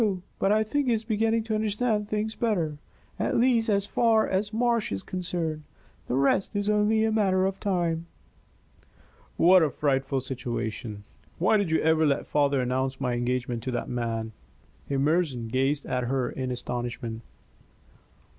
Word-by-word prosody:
But 195 - +2
I 215 +1 +4
think 275 +6 -1
he 240 - +3
is 220 -1 -1
beginning 225 0 +1
to 220 0 -3
understand 215 0 0
things 215 +1 -1
better 170 -12 -1 0.4
at - - 0
least, 235 -2 +3
as 200 -1 +2
far 225 0 +3
as 200 +2 -1
Marsh 235 0 +1
is 95 -1 -3
concerned. 175 -4 -3 0.5
The 125 - -1
rest 140 +10 +2
is 205 +1 +1
only 210 +1 +3
a 220 - +2
matter 190 -4 +2
of 195 0 -2
time." 170 -4 -1 1.3
"What 180 +2 +6
a 155 - +3
frightful 135 -1 0
situation! 120 -4 -4 0.3
Why 185 +5 +3
did 200 -4 0
you 160 - +2
ever 160 0 +3
let 140 - 0
father 140 -2 +2
announce 130 +1 -1
my 125 -3 -1
engagement 120 0 -1
to 130 - -3
that 120 - -3
man?" 115 -2 -2 0.6
Emerson 140 -4 0
gazed 135 +4 0
at 125 -1 -1
her 125 0 -1
in 130 -1 -4
astonishment. 120 -2 -4
160 Hz, 155 wpm, -27 LUFS, 130-210 Hz, 1.3 s, What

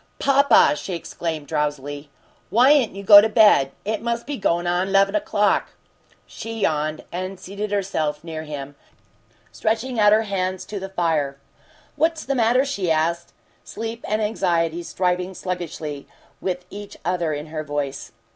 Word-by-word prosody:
"Papa!" 280 +1 +5
she 185 - -5
exclaimed, 165 -2 -5
drowsily. 145 -1 -3 0.4
"Why'n't 255 0 +4
you 200 - -7
go 205 0 +10
to 220 - +1
bed? 210 - +5
It 215 0 -2
must 235 0 -2
be 290 - -4
goin' 175 -6 0
on 180 +2 0
'leven 195 0 +4
o'clock!" 205 -1 +1 0.5
She 225 0 -7
yawned, 155 -3 0
and 185 +2 -5
seated 200 +3 -5
herself 160 -7 -1
near 160 -2 -6
him, 145 -2 -7 0.8
stretching 230 +2 -1
out 210 -1 +6
her 215 +1 +4
hands 185 -3 -2
to 205 - -6
the 195 0 -6
fire. 160 -7 0 0.6
"What's 320 +1 0
the 275 - 0
matter?" 250 +2 +3
she 200 -11 -2
asked, 165 +2 0 0.3
sleep 225 +1 -6
and 215 +1 0
anxiety 170 -5 0
striving 180 +1 -1
sluggishly 165 -6 -5 0.3
with 180 -1 -3
each 205 0 -9
other 175 -2 0
in 150 0 -4
her 155 -1 -3
voice. 145 -2 -4
185 Hz, 150 wpm, -22 LUFS, 160-215 Hz, 0.8 s, go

